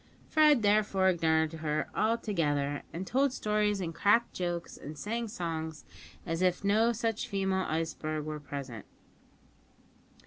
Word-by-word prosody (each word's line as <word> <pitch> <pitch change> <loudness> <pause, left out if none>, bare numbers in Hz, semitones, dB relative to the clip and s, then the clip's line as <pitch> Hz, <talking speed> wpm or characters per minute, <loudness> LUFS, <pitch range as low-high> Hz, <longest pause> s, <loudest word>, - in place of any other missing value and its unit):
Fred 300 -6 +5
therefore 205 -2 +3
ignored 160 -2 +2
her 155 -1 -2
altogether, 165 -11 0
and 180 +3 -5
told 270 +6 +2
stories 210 -4 0
and 170 -3 -3
cracked 205 +7 +3
jokes 175 -1 -3
and 150 +1 -9
sang 230 +7 -3
songs 160 -5 -4 0.4
as 165 0 -2
if 180 0 +1
no 215 +4 +3
such 230 +1 -2
female 190 -3 0
iceberg 155 -1 -2
were 155 0 -4
present. 135 -6 -7
185 Hz, 130 wpm, -30 LUFS, 160-215 Hz, 0.4 s, Fred